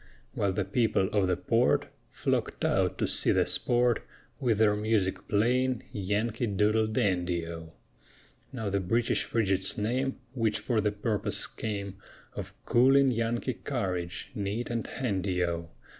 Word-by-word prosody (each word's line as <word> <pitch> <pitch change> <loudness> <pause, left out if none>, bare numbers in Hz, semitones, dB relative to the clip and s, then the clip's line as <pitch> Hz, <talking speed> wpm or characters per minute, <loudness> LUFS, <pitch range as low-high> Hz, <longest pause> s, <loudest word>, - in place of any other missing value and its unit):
While 100 -2 0
the 95 0 -1
people 100 -2 +1
of 100 -3 +2
the 90 -1 +1
port 115 +6 +2 0.2
Flocked - - -1
out - - +1
to - - 0
see - - +3
the - - +3
sport, 120 -1 +2 0.4
With 120 -6 +1
their 105 -1 +4
music 105 -3 0
playing 125 +4 +1
Yankee 105 +4 -1
Doodle 105 +2 +2
Dandy 90 -7 0
O! 80 -1 -8 0.8
Now 110 -6 -3
the 100 - +1
British 115 +5 +1
Frigate's 100 -4 0
name 130 +5 -1 0.2
Which 110 -4 +1
for 115 -4 0
the 105 0 +1
purpose 105 0 -1
came 100 -3 -5 0.4
Of - - -7
cooling 135 +3 +5
Yankee 115 +2 -1
courage 95 -9 -3
Neat 105 +4 -3
and 115 -2 -2
handy 95 -7 -1
O! 85 -1 -2
105 Hz, 145 wpm, -29 LUFS, 95-120 Hz, 0.8 s, cooling